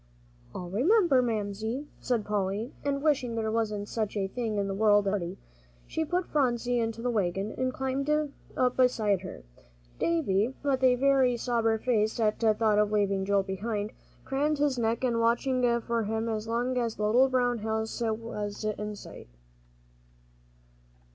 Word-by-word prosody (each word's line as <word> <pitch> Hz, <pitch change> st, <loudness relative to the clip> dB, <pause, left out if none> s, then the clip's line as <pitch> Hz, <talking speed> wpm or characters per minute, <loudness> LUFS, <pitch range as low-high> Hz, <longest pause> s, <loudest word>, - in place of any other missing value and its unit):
"I'll 175 Hz, -1 st, -6 dB
remember, 300 Hz, -, +4 dB
Mamsie," 220 Hz, +3 st, -2 dB
said 235 Hz, -4 st, -1 dB
Polly, 205 Hz, +3 st, -2 dB
and 280 Hz, 0 st, -1 dB
wishing 260 Hz, -6 st, +1 dB
there 220 Hz, -1 st, -1 dB
wasn't 210 Hz, -2 st, -1 dB
such 215 Hz, -2 st, -3 dB
a 195 Hz, -1 st, 0 dB
thing 220 Hz, 0 st, -3 dB
in 200 Hz, -1 st, 0 dB
the 195 Hz, -, -2 dB
world 205 Hz, 0 st, +4 dB
as -, -, +4 dB
a -, -, 0 dB
party, 180 Hz, -2 st, -3 dB, 0.5 s
she 320 Hz, -, -2 dB
put 355 Hz, +3 st, -1 dB
Phronsie 245 Hz, -4 st, +1 dB
into 225 Hz, 0 st, -2 dB
the 245 Hz, -, +1 dB
wagon, 195 Hz, -1 st, -1 dB
and 255 Hz, 0 st, -1 dB
climbed 265 Hz, +2 st, -2 dB, 0.5 s
up 250 Hz, -1 st, +2 dB
beside 220 Hz, -7 st, +2 dB
her. 185 Hz, -, -9 dB, 0.6 s
Davie, 255 Hz, -, +1 dB
with 270 Hz, -2 st, 0 dB
a 255 Hz, -1 st, +6 dB
very 265 Hz, -2 st, +3 dB
sober 230 Hz, -2 st, +1 dB
face 220 Hz, -1 st, 0 dB
at 215 Hz, -1 st, +1 dB
thought 215 Hz, -1 st, +3 dB
of 210 Hz, 0 st, +2 dB
leaving 200 Hz, -2 st, +1 dB
Joel 200 Hz, 0 st, +2 dB
behind, 205 Hz, +2 st, -3 dB, 0.3 s
craned 290 Hz, +3 st, 0 dB
his 285 Hz, -3 st, +1 dB
neck 230 Hz, +2 st, 0 dB
and 235 Hz, -2 st, +1 dB
watched 235 Hz, +3 st, +2 dB, 0.4 s
for 235 Hz, -1 st, 0 dB
him 220 Hz, +2 st, -2 dB
as 220 Hz, -1 st, -3 dB
long 245 Hz, +2 st, 0 dB
as 230 Hz, -2 st, -1 dB
the 210 Hz, -, -2 dB
little 250 Hz, +5 st, +4 dB
brown 245 Hz, -2 st, +1 dB
house 220 Hz, +2 st, -3 dB
was 215 Hz, -2 st, -3 dB
in 210 Hz, 0 st, -3 dB
sight. -, -, -11 dB
225 Hz, 165 wpm, -28 LUFS, 210-255 Hz, 0.6 s, a